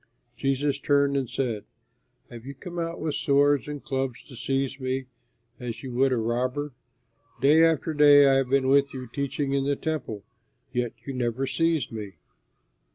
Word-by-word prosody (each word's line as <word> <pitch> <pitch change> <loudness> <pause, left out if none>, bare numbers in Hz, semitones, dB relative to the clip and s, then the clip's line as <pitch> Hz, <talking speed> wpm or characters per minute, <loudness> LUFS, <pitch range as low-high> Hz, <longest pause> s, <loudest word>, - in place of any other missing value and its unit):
Jesus 140 +1 0
turned 140 -1 +2
and 135 -4 -1
said, 115 -6 -2 0.7
"Have 120 -1 -9
you 140 - -7
come 175 +5 -7
out 165 0 -3
with 155 -2 -2
swords 145 0 +2
and 145 -1 -6
clubs 135 -2 -3
to 130 - -13
seize 135 +3 -2
me 130 0 -2 0.5
as 120 -1 -6
you 130 -2 -6
would 135 +2 +3
a 125 - +2
robber? 125 +5 -1 0.7
Day 150 +5 +5
after 160 -1 +2
day 145 -1 +7
I 135 -1 +5
have 135 -2 0
been 135 0 +2
with 140 0 +3
you 130 -1 -5
teaching 140 +2 -2
in 140 -1 +1
the 140 0 +1
Temple, 140 -10 -4 0.5
yet 120 -2 -1
you 135 - -4
never 125 +1 -1
seized 165 +1 0
me." 105 -4 -6
135 Hz, 170 wpm, -26 LUFS, 125-145 Hz, 0.7 s, day